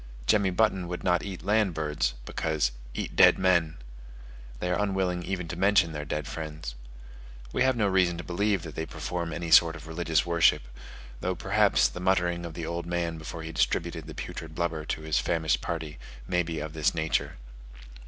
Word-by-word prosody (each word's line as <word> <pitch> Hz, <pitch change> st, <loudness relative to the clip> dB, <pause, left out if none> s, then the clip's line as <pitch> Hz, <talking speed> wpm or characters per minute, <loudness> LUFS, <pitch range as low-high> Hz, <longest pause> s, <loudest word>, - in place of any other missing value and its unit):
Jemmy 100 Hz, +4 st, +3 dB
Button 95 Hz, -2 st, +1 dB
would 90 Hz, 0 st, -5 dB
not 90 Hz, -2 st, +2 dB
eat 95 Hz, -4 st, -7 dB
land 105 Hz, -4 st, +2 dB
birds, 75 Hz, -6 st, -1 dB
because 80 Hz, -6 st, 0 dB, 0.2 s
"eat -, -, -4 dB
dead -, -, +7 dB
men": 85 Hz, -4 st, +2 dB, 0.8 s
they 90 Hz, -, -1 dB
are 90 Hz, -, +1 dB
unwilling 95 Hz, -3 st, 0 dB
even 90 Hz, -1 st, -3 dB
to 90 Hz, -, -4 dB
mention 95 Hz, -2 st, +3 dB
their 75 Hz, -1 st, -5 dB
dead 75 Hz, +1 st, -3 dB
friends. 75 Hz, -4 st, -6 dB, 0.8 s
We -, -, 0 dB
have 130 Hz, 0 st, +4 dB
no 110 Hz, -, +2 dB
reason 95 Hz, -3 st, +2 dB
to 85 Hz, -, -6 dB
believe 100 Hz, 0 st, 0 dB
that 80 Hz, -3 st, -7 dB
they 80 Hz, +1 st, -4 dB
perform 85 Hz, -2 st, -4 dB
any 85 Hz, +1 st, -4 dB
sort 80 Hz, 0 st, +7 dB
of 75 Hz, -3 st, -10 dB
religious 80 Hz, -1 st, 0 dB
worship; 85 Hz, -6 st, +3 dB, 0.6 s
though -, -, -1 dB
perhaps -, -, +3 dB
the -, -, -8 dB
muttering 90 Hz, -2 st, +1 dB
of 80 Hz, -, -10 dB
the 85 Hz, -, -4 dB
old 85 Hz, +1 st, -4 dB
man 85 Hz, -2 st, -2 dB
before 80 Hz, +1 st, -7 dB
he 80 Hz, -, -6 dB
distributed 85 Hz, -1 st, -1 dB
the -, -, -8 dB
putrid 80 Hz, -1 st, -7 dB
blubber 80 Hz, -2 st, -2 dB
to 80 Hz, -, -3 dB
his 80 Hz, -1 st, +1 dB
famished 80 Hz, -2 st, 0 dB
party, 80 Hz, -3 st, -4 dB, 0.3 s
may 90 Hz, -, +2 dB
be 80 Hz, -2 st, -4 dB
of 80 Hz, -1 st, -5 dB
this 80 Hz, +1 st, +1 dB
nature. 80 Hz, -1 st, -1 dB
85 Hz, 190 wpm, -28 LUFS, 80-90 Hz, 0.8 s, dead